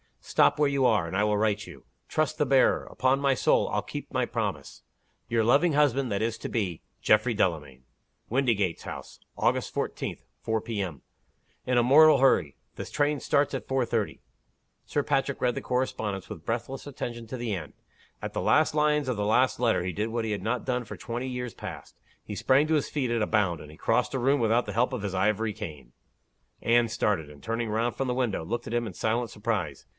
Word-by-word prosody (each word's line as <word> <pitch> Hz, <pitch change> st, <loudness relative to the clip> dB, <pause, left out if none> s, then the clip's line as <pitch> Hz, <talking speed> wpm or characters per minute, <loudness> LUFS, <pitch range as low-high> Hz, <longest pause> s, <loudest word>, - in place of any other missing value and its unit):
Stop -, -, +3 dB
where 150 Hz, -1 st, +3 dB
you 140 Hz, -2 st, +1 dB
are, 110 Hz, -8 st, +3 dB
and 85 Hz, -, -5 dB
I 100 Hz, -, +2 dB
will 105 Hz, 0 st, +2 dB
write 105 Hz, 0 st, 0 dB
you. -, -, -12 dB, 0.2 s
Trust 155 Hz, 0 st, 0 dB
the 150 Hz, -, +2 dB
bearer. 135 Hz, 0 st, +3 dB
Upon 130 Hz, +1 st, +1 dB
my 140 Hz, -1 st, +3 dB
soul, -, -, +3 dB
I'll -, -, 0 dB
keep -, -, -7 dB
my -, -, +1 dB
promise. -, -, -4 dB, 0.5 s
Your 115 Hz, 0 st, +1 dB
loving 145 Hz, +9 st, +4 dB
husband 140 Hz, -4 st, +2 dB
that 100 Hz, -, 0 dB
is 115 Hz, 0 st, -1 dB
to -, -, -5 dB
be, 95 Hz, -8 st, -2 dB, 0.2 s
"GEOFFREY 105 Hz, +3 st, +3 dB
DELAMAYN. 75 Hz, -, -1 dB, 0.5 s
"WINDYGATES 115 Hz, -8 st, +1 dB
HOUSE -, -, -8 dB, 0.2 s
Augt. -, -, +1 dB
14, -, -, -3 dB, 0.2 s
4 110 Hz, -1 st, -1 dB
P. 110 Hz, -2 st, -3 dB
M. 85 Hz, -9 st, -5 dB, 0.6 s
"In 125 Hz, -1 st, +1 dB
a 120 Hz, -, +5 dB
mortal 150 Hz, +3 st, +7 dB
hurry. 95 Hz, -, +3 dB, 0.2 s
The -, -, -5 dB
train 145 Hz, 0 st, 0 dB
starts 145 Hz, 0 st, +1 dB
4.30." 120 Hz, -5 st, -1 dB, 0.7 s
Sir 145 Hz, -, -1 dB
Patrick 140 Hz, -1 st, 0 dB
read 125 Hz, -1 st, +2 dB
the -, -, -4 dB
correspondence 110 Hz, -6 st, -2 dB
with 80 Hz, -, -9 dB
breathless 125 Hz, +5 st, -3 dB
attention 120 Hz, -4 st, -6 dB
to 130 Hz, -, -5 dB
the 120 Hz, -3 st, -2 dB
end. 80 Hz, -6 st, -5 dB, 0.5 s
At -, -, -5 dB
the -, -, -2 dB
last 155 Hz, -1 st, +3 dB
lines 150 Hz, -1 st, +2 dB
of 125 Hz, -, -1 dB
the 105 Hz, -, -1 dB
last 125 Hz, +5 st, +2 dB
letter 115 Hz, -7 st, +2 dB
he 90 Hz, -, -2 dB
did 105 Hz, +6 st, -2 dB
what 115 Hz, 0 st, -2 dB
he 110 Hz, -, -2 dB
had 100 Hz, -3 st, -3 dB
not 115 Hz, +3 st, -1 dB
done 125 Hz, -2 st, -1 dB
for -, -, -8 dB
twenty 120 Hz, +2 st, -4 dB
years 125 Hz, -2 st, -4 dB
past -, -, -9 dB, 0.3 s
he 105 Hz, -, -6 dB
sprang 135 Hz, +7 st, +3 dB
to 160 Hz, -, +2 dB
his 150 Hz, -, 0 dB
feet 130 Hz, -5 st, -1 dB
at 115 Hz, -1 st, +1 dB
a 105 Hz, -, +1 dB
bound, 95 Hz, -6 st, +1 dB
and 75 Hz, -, -11 dB
he 75 Hz, -, -13 dB
crossed -, -, +1 dB
a 135 Hz, -, 0 dB
room 135 Hz, +3 st, +3 dB
without 115 Hz, +1 st, +2 dB
the -, -, -5 dB
help 125 Hz, +3 st, +1 dB
of 120 Hz, -5 st, -3 dB
his 100 Hz, -2 st, -3 dB
ivory 105 Hz, +3 st, +1 dB
cane. 70 Hz, -10 st, -8 dB, 0.7 s
Anne 120 Hz, 0 st, +3 dB
started; 105 Hz, -9 st, -1 dB
and 75 Hz, -1 st, -15 dB
turning 115 Hz, 0 st, -2 dB
round 115 Hz, +3 st, 0 dB
from 135 Hz, -, -2 dB
the 125 Hz, -, -1 dB
window, 120 Hz, -10 st, -1 dB
looked 120 Hz, +5 st, -3 dB
at -, -, -6 dB
him 120 Hz, -1 st, 0 dB
in 100 Hz, -, -7 dB
silent 115 Hz, +4 st, -1 dB
surprise. 105 Hz, -11 st, -3 dB
115 Hz, 215 wpm, -27 LUFS, 105-130 Hz, 0.7 s, mortal